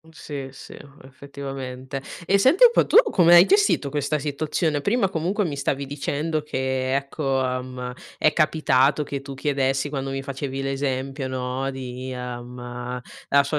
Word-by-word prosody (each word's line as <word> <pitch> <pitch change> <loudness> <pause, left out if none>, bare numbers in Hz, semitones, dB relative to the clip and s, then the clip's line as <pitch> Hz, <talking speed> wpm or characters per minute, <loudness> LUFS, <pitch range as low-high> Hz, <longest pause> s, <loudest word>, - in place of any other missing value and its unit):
Mh 160 - -23
sì, 140 -4 -7
sì, - - -11 0.3
effettivamente. 135 -1 -7 0.2
E 200 +1 +4
senti 315 - +6
un 475 - +9
po', - - +3
tu - - +2
come 175 -1 +6
hai 175 - +10
gestito 400 - +3
questa 150 +1 -1
situazione? 150 +1 -1
Prima 200 - +1
comunque 185 +4 -1
mi 150 -5 -3
stavi 140 0 -1
dicendo 145 +2 -2
che, 130 -2 -1
ecco, 135 -1 -1
ehm, 125 -1 -4 0.3
è 155 - +3
capitato 150 -3 +3
che 140 -1 -4
tu 140 0 -8
chiedessi 135 0 0
quando 135 -2 -3
mi 135 0 -3
facevi 135 0 -4
l'esempio, 135 0 -2
no, 130 +1 -2
di, 130 0 -6
ehm, 125 0 -6 0.3
la 140 0 +5
sua 150 +2 -1
135 Hz, 160 wpm, -24 LUFS, 130-150 Hz, 0.3 s, hai